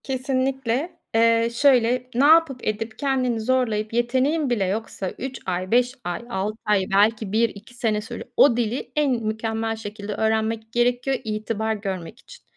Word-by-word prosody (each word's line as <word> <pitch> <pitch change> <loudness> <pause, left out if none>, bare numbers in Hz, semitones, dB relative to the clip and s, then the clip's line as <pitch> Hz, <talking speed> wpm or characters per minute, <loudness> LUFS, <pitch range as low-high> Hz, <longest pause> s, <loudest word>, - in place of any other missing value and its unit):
Kesinlikle. 265 +2 -1 0.2
Eee, 230 0 +4
şöyle: 250 -1 +3
Ne 265 +4 +4
yapıp 315 -4 +5
edip 220 +1 -3
kendini 255 -5 0
zorlayıp 225 -3 0
yeteneğin 260 +5 +1
bile 220 -6 +1
yoksa 195 -1 -3
3 265 0 -5
ay 185 0 -3
5 245 +1 +3
ay 175 +2 -3
6 210 +1 -2
ay 205 -2 +3
belki 210 0 +3
1-2 225 0 -1
sene 225 -3 0
sürüyor. 220 - -7
O 245 -4 +6
dili 240 +2 -2
en 295 -2 +2
mükemmel 225 -1 -2
şekilde 210 -1 -6
öğrenmek 220 0 -1
gerekiyor 245 +3 +1
itibar 220 0 -2
görmek 195 +1 -5
için. - - -15
230 Hz, 150 wpm, -23 LUFS, 215-255 Hz, 0.2 s, O